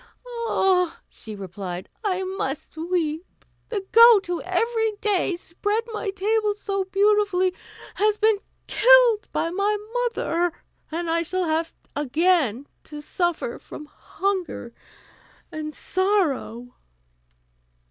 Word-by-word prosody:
"Ah!" 365 -5 +2
she 215 -1 -10
replied, 185 -2 -6 0.2
"I 380 -2 0
must 370 -8 -4
weep. 325 -1 -1 0.5
The 405 -4 -3
goat, 460 -3 +8
who 350 -1 -3
every 445 +4 0
day 405 -3 0
spread 410 +6 -2
my 425 -1 -3
table 415 +2 0
so 395 -2 -2
beautifully, 390 -1 +2 0.4
has 420 0 +2
been 430 -1 +3 0.3
killed 485 -2 +5
by 330 - -1
my 400 +3 +1 0.3
mother, 350 -7 -1 0.4
and 340 +2 -3
I 335 +1 +1
shall 370 +2 -1
have 320 +1 0 0.2
again 290 - +1 0.2
to 300 -1 -9
suffer 345 +8 -2
from 300 - -10
hunger 360 -5 -4 0.8
and 305 -1 -6
sorrow." 315 - -1
370 Hz, 110 wpm, -24 LUFS, 315-415 Hz, 0.8 s, goat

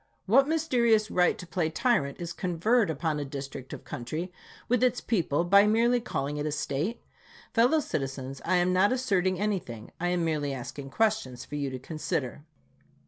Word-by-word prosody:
What 265 +8 +5
mysterious 240 -9 +2
right 180 -1 +3
to - - -8
play 170 -2 -1
tyrant 160 - 0
is 170 -1 -5
conferred 180 - +1
on 155 -2 +1
a - - -2
district 135 -1 -7
of - - -8
country, 155 +9 -5 0.3
with 245 0 +2
its 250 -1 +2
people, 170 -7 0
by 200 +4 +6
merely 235 +3 +3
calling 145 - -3
it 145 - -2
a - - -1
State? 150 - -2 0.5
Fellow 245 +7 +4
citizens, 135 - -4
I 185 - +1
am 180 +1 +2
not 190 +4 +4
asserting 190 -8 +1
anything; 180 - -3
I 175 - 0
am 175 -1 +1
merely 145 -4 -1
asking 130 +2 -7
questions 205 - 0
for - - -14
you 145 -2 -1
to 130 - -5
consider. 150 0 -4
175 Hz, 175 wpm, -28 LUFS, 140-220 Hz, 0.5 s, by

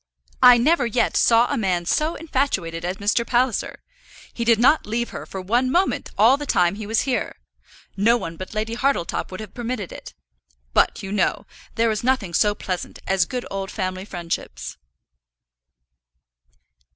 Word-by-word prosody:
I 250 -1 +9
never 275 +1 +3
yet 235 +1 0
saw 230 0 +5
a - - -1
man 180 -4 0
so 310 - 0
infatuated 225 - -2
as 180 +2 -3
Mr. 210 +4 +1
Palliser. 245 -1 0 0.5
He 235 - -3
did 230 -1 +4
not 260 +5 +4
leave 235 +2 -2
her - - -7
for 190 - -6
one 240 +7 +1
moment 360 +8 0
all 230 +7 +6
the 290 0 -6
time 175 -4 +3
he 210 0 -7
was 220 +1 +1
here. 260 -2 -2 0.6
No 225 +4 +3
one 165 -7 -6
but 185 +5 -8
Lady 220 +1 -2
Hartletop 245 -8 -1
would 185 - -8
have 215 -3 -9
permitted 235 -5 -4
it. - - -10 0.6
But, - - +2
you 195 - -5
know, 200 -3 0 0.3
there 230 0 +2
is 215 0 -3
nothing 240 -8 0
so 205 +3 +3
pleasant 185 -3 -5
as 190 -2 +2
good 250 -1 -4
old 195 0 -4
family 185 -2 -3
friendships." 175 -4 -5
220 Hz, 165 wpm, -22 LUFS, 190-250 Hz, 0.6 s, I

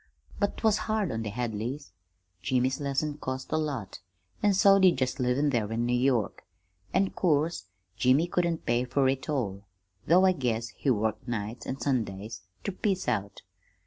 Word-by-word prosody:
"But't 205 +2 -1
was 220 -2 +4
hard 215 -4 +1
on 115 - -2
the 110 - -3
Hadleys. 120 +3 -4 0.5
Jimmy's 130 +1 +1
lessons 145 +1 -1
cost 130 0 -4
a - - +1
lot, 135 -11 -3 0.4
an' 205 -2 +3
so 195 +1 +6
did 185 -6 +5
just 130 0 -1
livin' 130 +4 +2
there 110 -4 0
in 115 +1 0
New 120 - 0
York, 125 -3 +1 0.5
an' 190 0 +2
'course 160 - +1 0.3
Jimmy 130 +8 +4
couldn't 175 -2 -1
pay 120 +1 +2
fer 130 +2 +1
it 135 +3 -2
all, 100 -9 -2 0.4
though 180 +3 +6
I 190 - +6
guess 120 -8 -1
he 140 - -3
worked 110 -1 0
nights 115 0 -4
an' 135 - -4
Sundays 110 -4 -2 0.2
ter - - -2
piece 190 0 -1
out. 100 -5 -2
130 Hz, 170 wpm, -28 LUFS, 115-160 Hz, 0.5 s, so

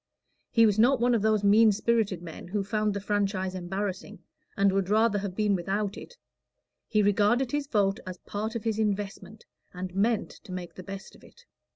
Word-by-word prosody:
He 230 -1 +5
was 210 -1 +2
not 250 +3 +5
one 245 +1 +3
of 230 - +2
those 215 -1 +2
mean 215 +2 +6
spirited 205 -4 0
men 170 0 -9
who 200 +2 -1
found 210 +1 -1
the - - -1
franchise 195 -2 -1
embarrassing, 190 +1 -4 0.4
and 200 0 +4
would 195 -1 0
rather 215 0 +3
have 195 -2 -5
been 210 -1 +2
without 195 +2 -1
it: - - -11 0.7
he 215 -2 +2
regarded 210 +5 +2
his 290 -1 -1
vote 200 -6 +1
as 185 -1 -6
part 215 +5 -5
of 230 - -3
his 220 -1 -1
investment, 205 -1 -3 0.3
and 180 0 -5
meant 215 +3 +1
to 200 - -14
make 180 -1 -6
the - - -9
best 195 +1 -9
of - - -19
it. - - -19
205 Hz, 195 wpm, -28 LUFS, 195-220 Hz, 0.7 s, mean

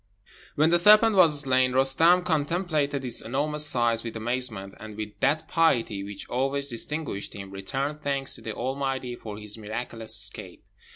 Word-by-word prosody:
When 155 +3 +3
the 175 - +5
serpent 215 +3 +6
was 160 -6 +5
slain, 130 -2 +2
Roostem 160 +7 +4
contemplated 150 -4 0
its 120 - -1
enormous 150 +5 -1
size 120 -4 +1
with 115 -1 -6
amazement, 110 -4 -3
and, 110 0 -10
with 105 -1 -4
that 155 +1 +1
piety 120 -11 +1
which 100 0 -7
always 135 +2 -1
distinguished 135 -3 -3
him, 100 -1 -8
returned 135 +10 -4
thanks 140 -2 -2
to - - -4
the 110 - -5
Almighty 130 -1 -3
for 105 -3 -9
his 105 +1 -5
miraculous 110 0 -2
escape. 100 0 -3
130 Hz, 160 wpm, -26 LUFS, 110-150 Hz, -, serpent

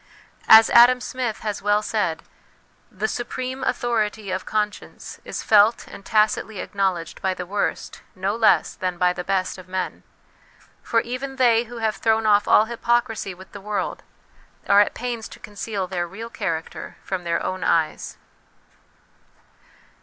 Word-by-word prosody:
As 220 0 +8
Adam 245 +1 +7
Smith 250 -3 -4
has 210 -2 -3
well 205 +1 +2
said, 195 -8 -1 0.7
"The 210 +3 -2
supreme 255 +3 -4
authority 220 -5 -1
of 185 0 -4
conscience 210 -1 -4
is - - -6
felt 215 +2 +4
and - - -12
tacitly 215 +1 +1
acknow 195 -1 -1
ledged 165 -2 -9
by 190 -1 0
the 180 - -5
worst, 200 +3 -3
no 195 +2 -1
less 225 -1 +3
than 185 -2 -3
by 180 0 +2
the 180 - -5
best, 190 0 -1
of 185 - -13
men; 185 0 -4 0.8
for 230 - +1
even 255 +3 -5
they 240 -3 +3
who 240 +1 -10
have 220 -3 -1
thrown 220 +2 +1
off 205 -1 +4
all 215 - +6
hypocrisy 235 -4 -1
with 190 +1 -14
the 200 - -10
world, 210 +1 -3 0.7
are 200 +1 +6
at 205 - 0
pains 240 -2 -4
to - - -13
conceal 205 -1 -5
their 180 -2 -3
real 225 +6 -8
character 165 -8 -5
from 185 -2 -4
their 170 -1 -1
own 185 0 -3
eyes." 160 -2 0
210 Hz, 155 wpm, -23 LUFS, 190-230 Hz, 0.8 s, As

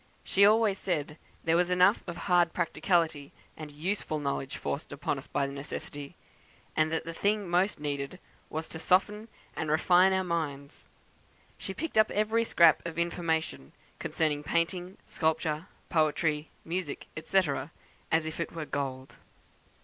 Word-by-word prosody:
She 200 +1 +5
always 215 -2 +3
said 150 -4 -2 0.2
there 165 0 +2
was 180 +1 +3
enough 180 +3 +4
of 175 0 -5
hard 175 -3 +4
practicality 165 -3 0 0.2
and 155 -1 -8
useful 155 +1 -2
knowledge 140 -2 -3
forced 145 - -4
on 140 0 -2
us 135 - -12
by 140 - 0
necessity, 140 +1 -7 0.6
and 155 0 +2
that 160 - -1
the 165 - -5
thing 205 +3 0
most 180 +1 +1
needed 145 +2 -3 0.3
was 160 +1 -4
to 160 - -6
soften 205 +6 +2 0.3
and 155 - -2
refine 180 +4 +5
our 190 0 +2
minds. 150 -5 -4 0.7
She - - -5
picked 320 -9 0
up 215 - +5
every 220 +2 +1
scrap 170 -7 +5
of 170 -1 -6
information 165 - -1 0.3
concerning 150 -2 0
painting, 175 +4 -1
sculpture, 160 0 -1 0.2
poetry, 155 -1 +1 0.2
music, 170 -3 -3 0.2
&c., 195 - +3 0.7
as 160 0 +3
if 160 +1 -5
it 170 - -2
were 165 -2 -4
gold." 135 -2 -4
165 Hz, 145 wpm, -29 LUFS, 150-180 Hz, 0.7 s, She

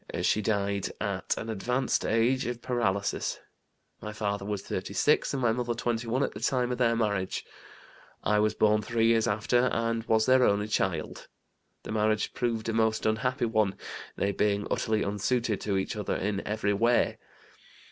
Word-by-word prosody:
She 105 - +2
died 100 -2 0
at - - -1
an 115 - -4
advanced 125 +5 0
age, 115 +3 +2
of 120 -1 -5
paralysis. 100 -5 -1 0.6
My 105 - -5
father 100 -2 -2
was 105 -1 -3
36 100 +10 +1
and 140 - -2
my 120 -3 +2
mother 120 0 -1
21 120 +2 -1
at - - -1
the - - -7
time 125 +1 0
of 125 - -3
their 115 -2 +3
marriage. 100 -5 -1 0.8
I 105 +1 +2
was 105 0 +2
born 105 0 +3
three 115 +1 0
years 115 -1 +3
after 115 +4 +2
and 115 0 -1
was 110 -1 +3
their 130 0 +5
only 105 -1 +2
child. - - -2 0.6
The - - -7
marriage 110 0 +1
proved 115 -3 -2
a 115 - -1
most 110 -1 +1
unhappy 125 +4 +1
one, 110 -4 +1 0.4
they 100 - 0
being 100 0 0
utterly 110 -1 +1
unsuited 105 +2 0
to 100 -2 0
each 95 - -2
other 105 -2 -2
in 100 +1 -1
every 105 -1 0
way. 115 +4 +2
110 Hz, 165 wpm, -28 LUFS, 105-120 Hz, 0.8 s, their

